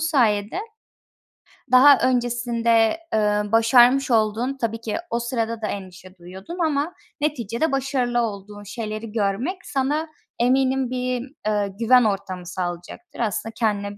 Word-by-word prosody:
sayede 240 - +1 1.1
daha 275 +3 +8
öncesinde, 240 -1 +1 0.2
eee, 210 -1 +2
başarmış 245 +3 +5
olduğun 225 +4 +1
-tabii 230 -2 -3
ki 220 +4 -3
o 235 - -1
sırada 230 -1 -3
da 215 - -2
endişe 185 -1 -8
duyuyordun 190 - -10
ama 300 +3 -1 0.3
neticede 275 0 -1
başarılı 255 -3 0
olduğun 205 -1 -5
şeyleri 215 +1 -6
görmek 230 - -2
sana 290 +4 -1 0.3
eminim 260 +1 +2
bir, 255 +1 -3
eee, 205 -2 0
güven 250 +1 +5
ortamı 195 -3 -2
sağlayacaktır. 180 - -6
Aslında 225 0 -2
kendine 205 -3 -2
230 Hz, 120 wpm, -23 LUFS, 210-260 Hz, 1.1 s, daha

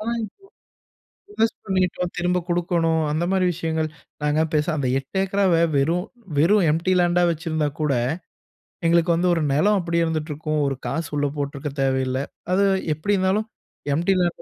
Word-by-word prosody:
ஆனா, 230 +2 -2
இப்போ 390 - -12 0.9
இன்வெஸ்ட் 225 - 0
பண்ணிட்டோம், 180 -2 0
திரும்ப 180 0 +1
குடுக்கணும் 170 -2 +1
அந்த 155 +3 0
மாரி 190 -1 +2
விஷயங்கள். 160 -2 -2 0.3
நாங்க 150 +2 +2
பேசாம 150 +2 +1
அந்த 135 -3 0
8 135 +8 -4
ஏக்கராவே 190 -4 +2
வெறும் 170 +7 +1 0.3
வெறும் 185 +4 +4
எம்ப்டி 170 +4 +1
லேண்டா 175 0 +3
வச்சிருந்தாக்கூட, 155 -3 -1 0.9
எங்களுக்கு 170 0 +3
வந்து 175 +1 +2
ஒரு 165 - 0
நெலம் 200 +8 +3
அப்டியே 170 -1 0
இருந்துட்டுருக்கும். 155 -1 -2
ஒரு 135 -2 -2
காசு 165 -1 -3
உள்ள 145 - +1
போட்டிருக்கத் 140 0 -4
தேவையில்லை. 130 0 0 0.3
அது 200 +2 +3 0.3
எப்படி 200 +7 0
இருந்தாலும் 190 +4 +1 0.5
எம்ப்டி 175 +5 +2
லேண்ட் 175 -1 -1
170 Hz, 145 wpm, -23 LUFS, 155-180 Hz, 0.9 s, வெறும்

